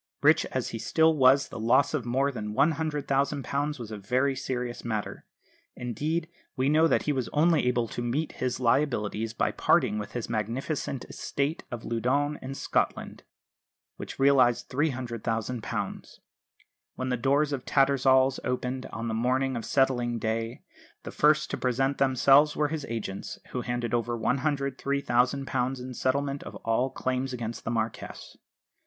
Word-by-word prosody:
Rich - - +5
as - - -3
he - - -5
still 160 0 +3
was, 135 0 +5
the - - -7
loss 120 +6 +3
of 130 -6 -2
more 135 +4 +1
than 105 -4 -5
£100,000 145 -1 0
was 115 -2 -7
a 110 - -5
very 130 +7 +1
serious 125 -2 -4
matter. 110 -3 -4 0.5
Indeed 155 +7 -2 0.3
we 130 +2 +1
know 155 +2 +5
that - - +2
he 150 - 0
was 130 -4 -2
only 155 -2 +3
able 120 -2 +1
to - - -4
meet 130 +7 -1
his 125 -1 -3
liabilities 115 -4 0
by - - +1
parting 105 - +2
with 105 0 -7
his 120 -2 -3
magnificent 120 +5 -3
estate 140 +3 -3
of 120 -2 -6
Loudoun 135 +6 0
in 135 +1 -6
Scotland, - - -1 0.8
which - - -7
realised 135 -3 +4
£300,000. 120 -4 -3 0.8
When 130 0 -3
the 125 - +1
doors 140 +4 +1
of 130 -2 -3
Tattersall's 135 -1 +3
opened 125 +1 -2
on 115 +1 -5
the 110 - -2
morning 130 +3 +1
of 115 - -3
settling 125 -3 +1
day, 115 +1 -3 0.4
the - - -7
first 150 +1 +3
to - - -2
present 135 +2 0
themselves 135 +2 +5
were 150 -1 +1
his 155 -2 -4
agents, 105 -4 -5
who 125 - -2
handed 120 -2 -3
over 120 0 0
£103,000 135 0 0
in 125 +1 -7
settlement 140 +3 -1
of - - -9
all 115 +4 +1
claims 130 0 -2
against 115 -2 -5
the - - -2
Marquess. 115 -1 -4
130 Hz, 150 wpm, -28 LUFS, 120-140 Hz, 0.8 s, Rich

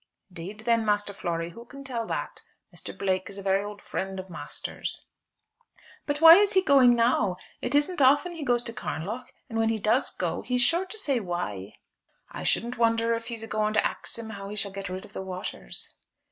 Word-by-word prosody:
"'Deed, 190 +6 -7
then, 230 0 +2
Master 205 -1 0
Flory, 170 -3 -3
who 230 +7 -11
can 275 +3 -11
tell 235 -4 -3
that? - - -4 0.3
Mr. - - -6
Blake 185 -1 0
is 200 - -8
a 200 - -7
very 195 0 +2
old 205 0 -8
friend 190 0 -4
of 185 -1 -8
master's." 170 - -3 1.0
"But 290 0 0
why 325 +1 +11
is 410 0 +4
he 375 -1 +4
going 265 -6 +6
now? 230 -6 +2 0.2
It - - -1
isn't 295 +3 +2
often 290 +6 +5
he 325 -3 -6
goes 245 -3 +2
to 230 - -4
Carnlough; 215 +7 -4 0.2
and 225 -3 -3
when 225 0 +3
he 225 - +1
does 215 +5 +2
go, - - -3
he 250 - -2
is 250 - +2
sure 345 +7 +2
to 435 - -5
say 280 - +1
why." 115 - -4 0.6
"I - - -6
shouldn't 235 +1 0
wonder 230 0 +3
af 230 0 -3
he's 230 -2 -5
going 215 -1 0
to - - +3
ax - - -2
him 225 -1 -6
as 210 - -7
to - - -9
how 195 - -6
he 210 - -6
shall 200 -1 -1
get 195 -1 -6
rid 185 +1 -5
of - - -17
the - - -4
waters." 185 - -5
225 Hz, 220 wpm, -27 LUFS, 195-250 Hz, 1.0 s, why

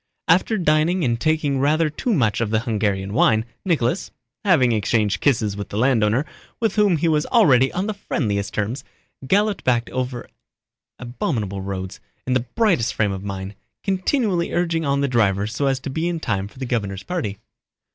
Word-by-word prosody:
After 185 +6 +3
dining 165 +1 +2
and 115 -2 0
taking 155 -3 +1
rather 155 +4 +2
too 155 - -2
much 115 - +1
of 115 - 0
the 110 0 +1
Hungarian 100 -4 -1
wine, 110 -1 +3 0.2
Nicholas—having 165 - 0
exchanged 105 -2 +1
kisses 110 -7 +1
with 100 0 -6
the 100 - -5
landowner, 120 +1 +2 0.3
with 225 -4 +1
whom 205 -5 +3
he 165 - 0
was 155 -2 +1
already 135 - +4
on 185 +2 -2
the 215 - -2
friendliest 105 - -2
terms—galloped 140 - -2
back 120 -2 +1
over 125 -1 -3 0.7
abominable 115 - -3
roads, 95 0 -5 0.3
in 130 - 0
the 125 -1 0
brightest 205 - +2
frame 105 -2 +1
of 95 0 -5
mind, 100 0 -5 0.3
continually 190 -2 0
urging 170 -2 0
on 140 0 +1
the 140 - +1
driver 105 -6 +2
so 115 +6 -1
as 135 -1 +1
to 135 - -5
be 160 +5 -1
in 170 -1 -2
time 100 -9 -2
for 105 - -18
the 130 - -4
governor's 100 -5 -2
party. 155 - -3
130 Hz, 170 wpm, -22 LUFS, 105-165 Hz, 0.7 s, already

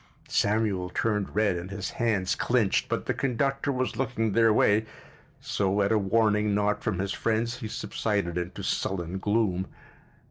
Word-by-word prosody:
Samuel 100 -4 +1
turned 105 0 -1
red 105 -3 +2
and 85 +2 -6
his 100 -1 -4
hands 105 -6 0
clinched, 115 -6 +1
but - - -2
the - - 0
conductor 135 +2 0
was 130 -2 -1
looking 115 -4 0
their 115 +2 +4
way, 105 +1 +3 0.5
so 100 0 0
at 100 - +1
a 110 - +4
warning 105 0 +2
nod 105 0 +1
from - - -1
his 95 +1 -2
friends 115 +3 -1
he 115 - -5
subsided 100 -5 -2
into 90 0 -4
sullen 95 0 -2
gloom. 100 -3 0
105 Hz, 155 wpm, -27 LUFS, 95-115 Hz, 0.5 s, their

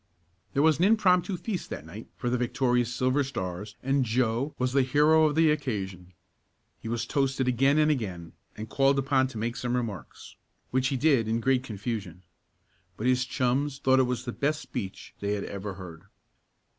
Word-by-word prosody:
There 140 - +3
was 160 -1 +4
an 180 - +4
impromptu 195 -3 +3
feast 195 0 -4
that - - -6
night - - -10
for - - -4
the 125 - +2
victorious 125 -1 +1
Silver 130 +3 +1
Stars 100 -5 -5
and 135 +1 +2
Joe 120 +3 0
was 125 0 -1
the 135 - +4
hero 150 +4 +4
of 150 - -1
the 160 -1 +5
occasion. 95 - -4 0.7
He - - -8
was 115 0 -2
toasted 135 -2 0
again 135 +4 +3
and 155 0 +4
again, 95 - -4 0.2
and 110 +1 -6
called 135 +4 +2
upon 135 -1 +2
to 130 - -9
make 115 +2 -2
some 125 0 -2
remarks, 110 - -6 0.3
which 130 +1 +2
he 135 - -1
did 135 -5 +3
in 115 +1 0
great 130 +1 +2
confusion. 105 -6 -5 0.7
But 110 - -4
his 125 0 +2
chums 130 +3 0
thought 130 -1 +3
it 125 -1 0
the 120 - -3
best 150 +5 -1
speech 100 -6 -7
they 100 0 -1
had 100 - -2
ever 100 0 -6
heard. 90 -2 -10
125 Hz, 180 wpm, -27 LUFS, 110-140 Hz, 0.7 s, the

